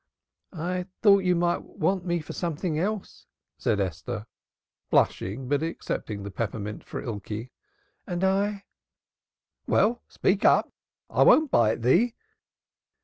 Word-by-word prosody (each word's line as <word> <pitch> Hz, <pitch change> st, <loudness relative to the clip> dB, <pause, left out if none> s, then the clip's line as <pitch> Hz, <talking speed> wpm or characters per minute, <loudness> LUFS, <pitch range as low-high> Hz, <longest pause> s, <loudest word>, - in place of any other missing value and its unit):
"I 180 Hz, +2 st, -2 dB, 0.2 s
thought 200 Hz, -3 st, +6 dB
you 180 Hz, -1 st, +3 dB
might 175 Hz, 0 st, +1 dB
want 185 Hz, 0 st, -1 dB
me 175 Hz, -1 st, 0 dB
for -, -, -8 dB
something 165 Hz, -1 st, -2 dB
else," 205 Hz, +3 st, -3 dB, 0.3 s
said 105 Hz, -, +1 dB
Esther, 100 Hz, +5 st, -3 dB, 0.6 s
blushing 115 Hz, +8 st, +1 dB
but 145 Hz, +2 st, +1 dB
accepting 110 Hz, -10 st, -4 dB
the 100 Hz, -, -6 dB
peppermint 105 Hz, 0 st, -4 dB
for -, -, -6 dB
Ikey. 110 Hz, +2 st, -5 dB, 0.6 s
"And 175 Hz, -1 st, -2 dB
I 190 Hz, +1 st, +3 dB
I 205 Hz, -1 st, -6 dB, 0.5 s
" -, -, -55 dB
"Well, 235 Hz, +3 st, +2 dB
speak 195 Hz, +2 st, 0 dB
up! -, -, +4 dB, 0.3 s
I -, -, 0 dB
won't 310 Hz, -3 st, +6 dB
bite 115 Hz, 0 st, +3 dB
thee." 215 Hz, -, +3 dB
165 Hz, 135 wpm, -26 LUFS, -, 0.6 s, thought